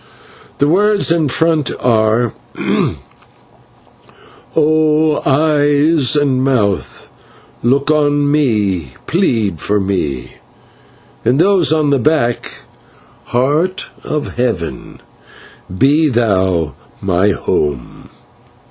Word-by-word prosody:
The 145 - +2
words 200 +3 +2
in 165 -3 +2
front 160 +1 +1
are: 115 -1 +1 2.2
'O 155 0 +2
Eyes 145 0 +2
and 135 -3 +1
Mouth, 110 -8 -1 0.5
look 140 +5 +1
on 145 -1 +1
me, 105 - 0
plead 115 - 0
for 105 +5 0
me.' 90 -10 -3 0.9
And 125 - +2
those 185 -2 +3
on 155 -2 +1
the 140 - +2
back: 125 -3 -1 0.6
'Heart 150 +9 -1
of 150 -4 -4
Heaven, 120 -9 -3 0.7
be 145 - +2
thou 95 - 0 0.3
my 95 +1 +1
home.'" 75 -8 -3
135 Hz, 85 wpm, -15 LUFS, 105-155 Hz, 2.2 s, those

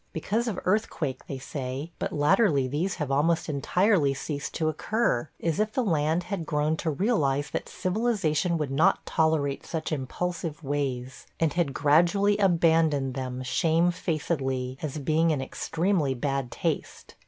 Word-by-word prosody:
Because 220 +9 -1
of 205 -5 -2
earthquake 180 - -1
they 135 - -4
say; 135 +3 -5
but - - -2
latterly 150 - +3
these 155 +9 -1
have 150 -5 -3
almost 160 +4 +2
entirely 155 +1 +2
ceased 145 +1 -5
to 160 - 0
occur, 155 - 0
as 165 0 -1
if 215 0 0
the 255 - +1
land 160 -3 +1
had 175 -3 -4
grown 150 0 +1
to 160 - -2
realize 145 - +1
that - - -4
civilization 185 -4 0
would 150 -4 -2
not 140 +4 +3
tolerate 155 -3 +1
such 160 -1 -4
impulsive 160 +3 -3
ways, 135 -3 -3
and 160 -3 +2
had 165 -6 0
gradually 175 +8 +4
abandoned 165 -7 +3
them 130 -1 -4
shamefacedly, 155 -4 0
as 155 -1 -4
being 155 +3 +2
in 155 -4 +1
extremely 160 +2 0
bad 135 0 -2
taste. - - -3
155 Hz, 145 wpm, -27 LUFS, 140-175 Hz, -, gradually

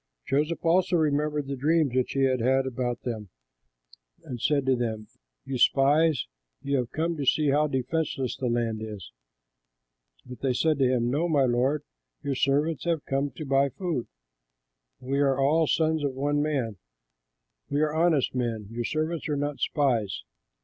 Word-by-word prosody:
Joseph 150 +4 -1
also 180 +2 +3
remembered 150 -1 0
the 140 0 -4
dreams 150 0 +2
which 130 -1 0
he 135 - +1
had 130 -1 +2
had 130 +3 +2
about 125 -1 -3
them 110 -5 -4 0.9
and 120 -3 -7
said 145 -3 +1
to 135 -1 +3
them, 110 -3 -3 0.4
"You 135 -2 -3
spies! 145 - +4 0.4
you 140 0 0
have 125 -2 -1
come 165 +2 -1
to 145 - -2
see 150 +1 +3
how 150 +2 +3
defenseless 135 0 -2
the 130 - -3
land 115 -2 -1
is." 105 - -7 1.1
But 125 - -10
they 135 -2 +1
said 155 +3 +1
to 130 - +4
him, 120 -1 +1
"No, 160 +6 0
my 145 -4 +3
lord; 130 +4 +1 0.4
your 140 - -1
servants 145 +5 +1
have 165 -3 0
come 135 +1 0
to 155 - -6
buy 135 0 +3
food. 165 -5 -3 0.9
We 135 +2 -2
are 135 -1 +2
all 155 +4 +3
sons 160 -1 +1
of 140 -2 -1
one 145 +2 0
man; 135 -9 -1 0.9
we 145 +1 0
are 155 -1 +1
honest 160 -4 +2
men; 115 -5 -2
your 120 +1 -3
servants 155 +3 -2
are 145 - 0
not 145 0 -2
spies." 120 - 0
140 Hz, 170 wpm, -27 LUFS, 125-150 Hz, 1.1 s, spies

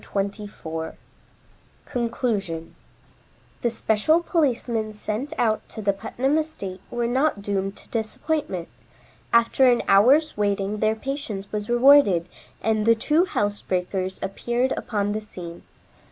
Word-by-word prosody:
CHAPTER - - -8
XXIV 195 -5 -4 0.9
CONCLUSION 220 -9 -2 0.9
The 240 - +2
special 230 +9 +2
policemen 240 -10 0
sent 215 +7 -4
out 220 -2 +2
to - - -9
the 200 0 +2
Putnam 250 +9 0
estate 200 - -5
were 240 -1 -1
not 255 -3 +1
doomed 195 -1 -2
to - - -13
disappointment. 225 - -2 0.6
After 235 +3 +5
an 240 - +1
hour's 265 +11 +5
waiting, 205 0 0
their 215 +1 +2
patience 220 -6 -5
was 210 0 -3
rewarded, 240 -8 +6 0.4
and 220 -1 +1
the 230 - +7
two 305 +10 +2
housebreakers 190 - -2
appeared 240 +6 -1
upon 205 -2 -1
the 215 +1 -2
scene. 175 -5 -9
215 Hz, 125 wpm, -24 LUFS, 200-250 Hz, 0.9 s, the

